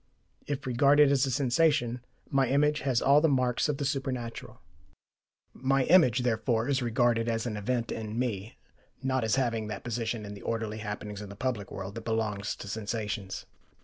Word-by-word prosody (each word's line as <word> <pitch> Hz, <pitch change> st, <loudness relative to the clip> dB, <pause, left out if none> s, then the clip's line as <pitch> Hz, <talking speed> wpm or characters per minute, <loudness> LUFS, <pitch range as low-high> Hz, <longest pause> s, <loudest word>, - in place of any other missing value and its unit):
If 145 Hz, -1 st, -3 dB
regarded 140 Hz, +3 st, +5 dB
as 135 Hz, -1 st, +3 dB
a -, -, -1 dB
sensation, 130 Hz, -1 st, +1 dB, 0.2 s
my 135 Hz, -1 st, +2 dB
image 150 Hz, +3 st, +2 dB
has 130 Hz, -3 st, 0 dB
all 140 Hz, +2 st, +6 dB
the 160 Hz, -, +4 dB
marks 130 Hz, 0 st, +1 dB
of 145 Hz, -, 0 dB
the 140 Hz, -, -2 dB
supernatural. 130 Hz, -4 st, -4 dB, 0.9 s
My 135 Hz, +1 st, +1 dB
image, 135 Hz, -7 st, +5 dB
therefore, 115 Hz, 0 st, 0 dB
is 140 Hz, -1 st, +1 dB
regarded 120 Hz, -1 st, +2 dB
as 115 Hz, 0 st, -1 dB
an 115 Hz, -3 st, -3 dB
event 115 Hz, +3 st, -2 dB
in 110 Hz, 0 st, -4 dB
me, 110 Hz, -4 st, -3 dB, 0.5 s
not 130 Hz, -2 st, +1 dB
as 110 Hz, +1 st, +2 dB
having 115 Hz, -5 st, 0 dB
that 105 Hz, -2 st, -6 dB
position 115 Hz, -2 st, -3 dB
in 100 Hz, -, -7 dB
the 100 Hz, -, -10 dB
orderly 110 Hz, -1 st, -3 dB
happenings 105 Hz, -1 st, -5 dB
of 105 Hz, -, -8 dB
the 100 Hz, -, -9 dB
public 110 Hz, -3 st, -2 dB
world 95 Hz, +1 st, -6 dB
that 115 Hz, 0 st, -8 dB
belongs 110 Hz, -3 st, -1 dB
to -, -, -9 dB
sensations. 105 Hz, -1 st, -4 dB
120 Hz, 180 wpm, -29 LUFS, 110-135 Hz, 0.9 s, all